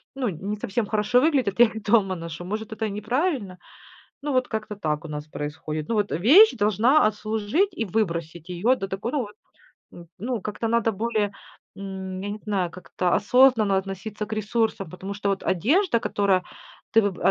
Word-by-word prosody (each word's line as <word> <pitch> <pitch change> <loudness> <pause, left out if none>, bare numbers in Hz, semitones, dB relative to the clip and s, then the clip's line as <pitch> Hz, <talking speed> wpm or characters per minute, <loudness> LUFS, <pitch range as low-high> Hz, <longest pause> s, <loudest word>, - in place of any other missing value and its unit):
ну, 255 -5 -1
не 195 +5 -4
совсем 210 +2 -2
хорошо 215 +3 +2
выглядят, 265 -10 +1
я 240 - +9
их 220 -1 -6
дома 205 -3 +3
ношу. 170 +1 -7
Может, 215 +3 -4
это 220 0 -2
неправильно. 215 - -1 0.6
Ну, 290 -1 -2
вот 255 -1 +2
как-то 215 -1 -4
так 155 -4 -2
у - - -7
нас 150 -1 -5
происходит. 150 +2 -5
Ну, 230 - +1
вот, 210 -1 0
э, - - 0
вещь 355 - +7
должна 215 +6 +4
отслужить, 215 - 0
и 225 - -2
выбросить 170 -4 -2
её 205 +9 +2
до 195 - -4
такой 195 +5 -4
ну 295 - +1
вот, 210 -3 -8 0.6
м, 170 -1 -12
ну, 235 +2 -3
как-то 215 +2 -3
надо 230 -1 +2
более, 215 0 -1 0.5
м, 190 -1 -6
я 205 - -4
не 210 - -5
знаю, 195 -5 -1
как-то 180 0 -3
осознанно 230 -4 +4
относиться 195 +2 -5
к 220 - -4
ресурсам. 215 -4 -1
Потому 190 +2 -7
что 205 0 -2
вот 195 - -2
одежда, 245 - +2
которая 200 -4 +1 0.5
ты 225 - +8
выб 200 -3 -1
а, - - +5
210 Hz, 185 wpm, -24 LUFS, 190-230 Hz, 0.6 s, я